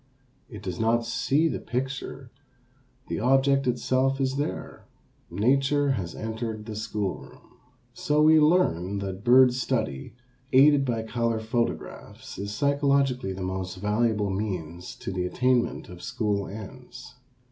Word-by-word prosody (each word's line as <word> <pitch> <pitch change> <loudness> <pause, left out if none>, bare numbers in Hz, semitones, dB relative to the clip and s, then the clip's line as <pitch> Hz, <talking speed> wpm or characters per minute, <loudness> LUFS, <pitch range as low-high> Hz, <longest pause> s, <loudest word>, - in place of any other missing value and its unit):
It 105 -5 -10
does 90 -2 -5
not 115 +1 +2
see 140 +6 +1
the - - -2
picture, 130 +2 -5 0.8
the - - -3
object 135 +3 +3
itself 130 +2 +1
is 135 0 0
there, 145 - -5 0.4
nature 135 +8 +2
has 95 -10 -3
entered 110 -1 -5
the 110 -1 -6
school 105 -2 -3
room. - - -17 0.3
So 150 -3 0
we 155 0 +7
learn 125 - +2
that 100 0 -5
bird 125 +1 +6
study, 115 - -2 0.4
aided 140 +1 +6
by 115 -3 -1
color 115 0 -1
photographs, 115 +2 -4
is 100 +1 -4
psychologically 140 -3 +1
the 95 0 -6
most 95 0 -4
valuable 105 +1 0
means 90 -4 -4
to - - -6
the 90 -1 -2
attainment 125 +3 0
of 90 -1 -11
school 100 0 -2
ends. 125 +4 -10
115 Hz, 135 wpm, -26 LUFS, 100-135 Hz, 0.8 s, we